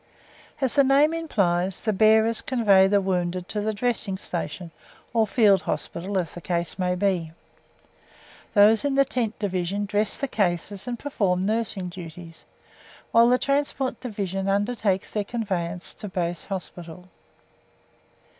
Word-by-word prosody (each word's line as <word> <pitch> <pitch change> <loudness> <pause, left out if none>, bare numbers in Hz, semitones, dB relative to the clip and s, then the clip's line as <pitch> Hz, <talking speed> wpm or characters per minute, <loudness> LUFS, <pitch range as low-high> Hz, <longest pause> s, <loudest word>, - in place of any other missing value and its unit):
As 265 -3 0
the 280 - +5
name 280 +4 +4
implies, 190 - 0
the 215 - +1
Bearers 220 +2 +4
convey 205 -7 +4
the 200 +1 +3
wounded 180 -1 -2
to 210 - -2
the 215 +1 0
dressing 215 -3 -1
station 170 -2 -5 0.4
(or 225 -2 +3
Field 205 -3 +4
Hospital, 190 +4 -3
as 175 -4 -2
the 175 - -9
case 170 +1 -3
may 180 -1 +1
be). 180 -4 -1 1.2
Those 215 +3 +6
in 285 -1 0
the 275 0 +4
Tent 235 -4 -2
Division 195 0 -2
dress 205 +1 0
the 275 - -2
cases 195 0 -1
and 240 -1 -3
perform 195 -9 -1
nursing 210 -4 -1
duties, 170 -1 -10 0.7
while 230 +1 +6
the 250 - +4
Transport 275 -1 -1
Division 195 -5 -3
undertakes 205 -1 0
their 210 - -1
conveyance 185 -6 -3
to 210 - -8
Base 175 -3 -3
Hospital. 180 -2 -7
200 Hz, 140 wpm, -25 LUFS, 180-230 Hz, 1.2 s, Those